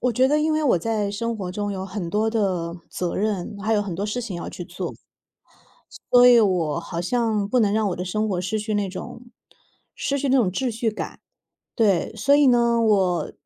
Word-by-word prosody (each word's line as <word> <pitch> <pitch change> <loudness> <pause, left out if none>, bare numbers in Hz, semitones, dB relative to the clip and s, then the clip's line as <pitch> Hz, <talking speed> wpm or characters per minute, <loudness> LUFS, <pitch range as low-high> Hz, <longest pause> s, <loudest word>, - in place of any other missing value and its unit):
我 250 0 +1
觉 260 +3 +3
得 300 - +3
因 310 +1 +1
为 310 0 +1
我 250 - +3
在 215 0 -1
生 230 +3 -3
活 190 -4 -5
中 205 +2 -3
有 190 -1 -4
很 190 -2 -5
多 215 +4 0
的 185 -7 -1 0.2
责 180 -1 -3
任， 205 -1 -2
还 215 +2 0
有 205 - +2
很 195 -4 -5
多 200 +4 -3
事 230 +4 -2
情 220 -7 -5
要 170 - -6
去 175 - -7
做。 180 0 -6 1.2
所 245 0 +8
以 245 -1 +8
我 175 -7 +1
好 170 0 -5
像 220 0 0
不 250 - +2
能 205 -3 +2
让 215 -1 +1
我 185 - -3
的 180 - -4
生 215 +4 -1
活 185 -3 -1
失 185 +4 -2
去 215 0 -3
那 205 -1 0
种 190 +5 -8 0.7
失 280 0 -2
去 280 0 -1
那 265 - +4
种 225 -8 +3
秩 250 +7 -1
序 225 0 -1
感。 215 - -7 0.5
对， 200 -7 +2
所 275 +7 +3
以 290 0 +5
呢， 235 -2 +3
我 195 -6 +1
210 Hz, 235 characters per minute, -23 LUFS, 185-235 Hz, 1.2 s, 所